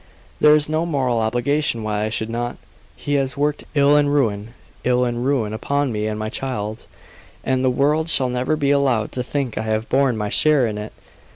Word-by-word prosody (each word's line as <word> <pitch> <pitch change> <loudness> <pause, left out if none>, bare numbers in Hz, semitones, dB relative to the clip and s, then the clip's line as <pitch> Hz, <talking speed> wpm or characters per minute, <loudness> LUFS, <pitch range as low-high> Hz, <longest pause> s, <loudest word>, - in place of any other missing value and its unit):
"There 150 0 +6
is 150 -1 +4
no 155 +1 0
moral 130 -7 0
obligation 120 +2 0
why 105 0 -1
I - - -2
should 110 0 -2
not. 120 +1 -3 0.4
He 145 - -4
has 130 0 -3
worked 145 +1 -1
ill 145 0 +4
and 145 -1 +3
ruin 115 -5 -1 0.3
ill 125 0 +2
and 120 0 -2
ruin 125 -6 0
upon 140 +4 -1
me 105 -1 -2
and 105 0 -3
my 110 0 -3
child, 110 -4 -5 0.6
and 130 0 0
the 130 - +3
world 150 +5 +1
shall 135 -5 +4
never 125 +5 0
be 145 -2 0
allowed 130 -6 +1
to 125 - -1
think 130 -1 -3
I - - -1
have 110 0 -2
borne 135 -3 +2
my 105 -1 -2
share 150 +2 +3
in 105 -2 -3
it. 105 +1 -7
125 Hz, 205 wpm, -21 LUFS, 110-145 Hz, 0.6 s, There